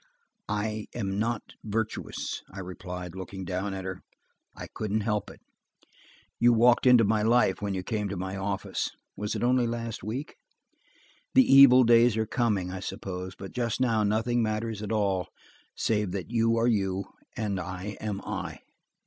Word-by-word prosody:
"I 105 0 -2
am 100 -4 -2
not 115 0 -1 0.2
virtuous," 110 +1 -3
I 95 - -12
replied, 90 -1 -7
looking 95 0 -7
down 95 +2 -2
at 95 -1 -6
her. 95 -1 -5 0.5
"I - - -7
couldn't 110 0 -2
help 105 -1 -1
it. - - -14 1.0
You 120 0 +6
walked 120 +2 +5
into 125 -2 +7
my 105 +1 +2
life 115 -3 +3
when 100 -1 -2
you 95 - -3
came 105 0 -2
to 100 - -4
my 95 +1 -4
office–was 100 +1 -4
it - - -2
only 125 0 +3
last 115 -1 -4
week? 125 +9 -5 1.0
The 260 - +8
evil 135 - +8
days 115 -1 +5
are 110 - +1
coming, 105 -6 0
I 95 - -5
suppose, 95 -1 -6
but 95 - -9
just 120 -2 -2
now 115 -4 +2
nothing 110 +3 +1
matters 110 -1 -2
at 105 - -4
all, 100 -4 +1 0.5
save 105 -4 0
that 100 +2 -5
you 115 -1 +2
are 115 - +2
you, 100 -4 +1 0.3
and 105 -4 -1
I 90 +3 -5
am 105 -2 -3
I." - - -5
105 Hz, 165 wpm, -28 LUFS, 95-115 Hz, 1.0 s, The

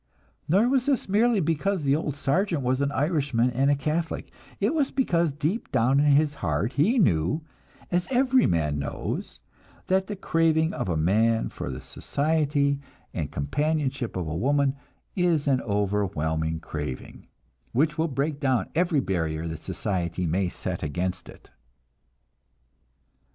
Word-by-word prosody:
Nor 200 +8 +4
was 260 0 +1
this 275 -5 +1
merely 215 +3 +3
because 165 +2 0
the 140 0 +3
old 150 -2 -2
sergeant 160 +2 0
was 130 +2 +1
an 140 0 +1
Irishman 140 -5 +1
and 135 +3 +2
a 145 - +4
Catholic; 155 +4 -2 0.3
it - - +1
was 290 -4 +1
because 170 - +1
deep 155 +10 -2
down 130 +5 +3
in 145 0 +4
his 150 0 +3
heart 85 - 0
he 200 - +3
knew, 140 - +2 0.5
as 175 0 +1
every 260 -1 +3
man 75 -3 0
knows, 70 - -4 0.5
that 190 0 +1
the 205 - -4
craving 165 -3 +2
of - - -3
a 85 - 0
man 110 +8 +2
for - - -6
the - - -5
society 145 -2 0 0.3
and - - -3
companionship 140 - -1
of 90 -3 -2
a 75 - -3
woman 140 - +2 0.4
is 175 -5 +2
an 135 -2 +2
overwhelming 90 -6 -1
craving, 75 -5 -6 0.4
which 150 +5 +1
will 165 - +2
break 145 +1 -2
down 130 -4 0
every 170 -4 +2
barrier 80 -5 -2
that 80 -1 -6
society 90 -2 -2
may 90 +3 0
set 90 0 -4
against 90 +4 -3
it. - - -15
140 Hz, 150 wpm, -26 LUFS, -, 0.5 s, Nor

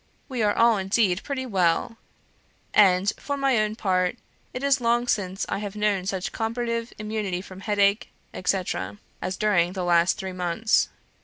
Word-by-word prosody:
We 255 -4 -3
are 205 -1 +2
all 230 -1 +5
indeed 195 0 +1
pretty 270 -2 -4
well; 190 +1 +1 0.8
and, 195 -1 +5
for 285 -1 -3
my 270 -4 +2
own 215 0 0
part, 185 -5 0 0.3
it 255 - -6
is 280 -2 +3
long 240 +1 +2
since 190 -4 -1
I - - -2
have 205 -1 -6
known 205 -3 0
such 190 -2 -2
comparative 230 +1 -2
immunity 215 -4 -3
from 190 -1 -11
headache, 200 0 +1 0.2
etc., 180 - -2 0.2
as 185 - -3
during 180 -4 +2
the 190 -2 -3
last 170 0 +3
three 190 -1 -5
months. 180 +5 +1
205 Hz, 160 wpm, -25 LUFS, 185-230 Hz, 0.8 s, all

